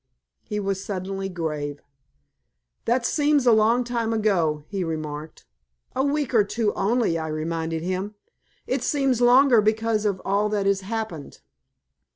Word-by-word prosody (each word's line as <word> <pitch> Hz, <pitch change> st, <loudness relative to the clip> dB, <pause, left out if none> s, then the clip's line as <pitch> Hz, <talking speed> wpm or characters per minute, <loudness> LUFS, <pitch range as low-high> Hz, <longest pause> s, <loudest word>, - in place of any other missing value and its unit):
He 210 Hz, -, -4 dB
was 195 Hz, -1 st, -2 dB
suddenly 195 Hz, -1 st, -4 dB
grave. 150 Hz, -5 st, -4 dB, 1.1 s
"That 240 Hz, +1 st, +1 dB
seems 290 Hz, -2 st, +2 dB
a 240 Hz, -, +6 dB
long 225 Hz, +3 st, +4 dB
time 235 Hz, -2 st, -1 dB
ago," 175 Hz, -9 st, +1 dB
he 195 Hz, -3 st, -3 dB
remarked. 155 Hz, -2 st, -5 dB, 0.5 s
"A 265 Hz, -, +1 dB
week 285 Hz, -2 st, -1 dB
or 220 Hz, -3 st, +5 dB
two 210 Hz, +1 st, -1 dB
only," 210 Hz, -5 st, +1 dB
I 160 Hz, -, -3 dB
reminded 160 Hz, +1 st, -3 dB
him. 185 Hz, +4 st, -3 dB, 0.5 s
"It -, -, -1 dB
seems 270 Hz, -5 st, +1 dB
longer, 245 Hz, -1 st, +6 dB
because 220 Hz, 0 st, +1 dB
of 200 Hz, -3 st, 0 dB
all 205 Hz, +2 st, +1 dB
that 205 Hz, -2 st, -1 dB
has 195 Hz, 0 st, +2 dB
happened. 195 Hz, -, -5 dB
205 Hz, 145 wpm, -24 LUFS, 170-230 Hz, 1.1 s, a